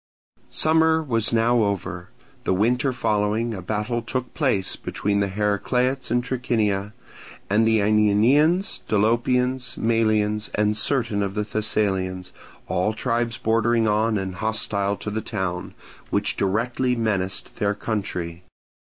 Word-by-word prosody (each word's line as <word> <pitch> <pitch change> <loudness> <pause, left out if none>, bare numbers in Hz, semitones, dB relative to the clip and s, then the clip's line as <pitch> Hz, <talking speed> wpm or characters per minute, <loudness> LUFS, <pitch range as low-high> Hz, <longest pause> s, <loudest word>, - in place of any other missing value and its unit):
Summer 160 0 +3
was 115 -6 +1
now 115 +1 +3
over. 95 -3 -2 0.4
The 95 - +2
winter 125 +7 +2
following 110 -1 0
a 95 - -6
battle 110 +5 -2
took 130 +1 -4
place 125 - +1
between 100 0 -2
the 100 - +1
Heracleots 105 +7 0
in 120 +1 +1
Trachinia 110 -5 -1 0.6
and 110 +2 +4
the 110 -1 +3
Aenianians, 115 - +3
Dolopians, 125 +3 +1
Malians, 110 -2 +1
and 105 0 +1
certain 115 -2 +1
of 100 0 -2
the 105 - 0
Thessalians, 95 -4 -1 0.4
all 95 +4 0
tribes 120 0 -1
bordering 115 0 +2
on 110 +1 +2
and 95 -1 -3
hostile 100 -1 -1
to 105 - -5
the 110 +1 -2
town, 95 -5 -4 0.3
which - - 0
directly 120 +6 0
menaced 100 -5 -2
their 100 0 0
country. 90 -5 -4
110 Hz, 125 wpm, -23 LUFS, 100-120 Hz, 0.6 s, and